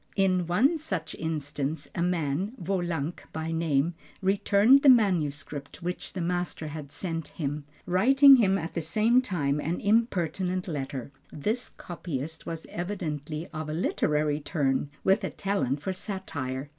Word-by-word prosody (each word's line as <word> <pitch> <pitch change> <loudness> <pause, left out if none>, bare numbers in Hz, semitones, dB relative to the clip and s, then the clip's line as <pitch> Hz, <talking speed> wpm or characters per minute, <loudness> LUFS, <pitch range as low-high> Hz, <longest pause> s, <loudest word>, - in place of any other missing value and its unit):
In 185 -3 +2
one 265 - +3
such 185 - -3
instance 145 -2 -3
a - - -2
man, 175 - 0
Wolanck 175 -4 -2
by 160 +1 -3
name, 160 -1 +1 0.3
returned 200 +6 +5
the 280 - +7
manuscript 155 - +1
which 180 +1 -4
the 185 - -3
master 175 -3 -2
had 145 -2 -7
sent 165 -3 -3
him, 145 -1 -4 0.2
writing 270 +9 +7
him 195 -5 +3
at 165 -2 -5
the 170 - -1
same 215 +10 +3
time 150 - -1
an 165 +4 -2
impertinent 185 -4 +1
letter. 135 -4 -4 0.2
This 215 - -1
copyist 160 -3 -6
was 165 -1 -5
evidently 160 -4 -4
of 155 -1 -4
a - - -2
literary 150 -3 +1
turn, 145 -3 0
with 195 +3 +3
a - - -1
talent 175 -9 -1
for 190 - -1
satire. 145 -9 -4
170 Hz, 145 wpm, -28 LUFS, 150-195 Hz, 0.3 s, the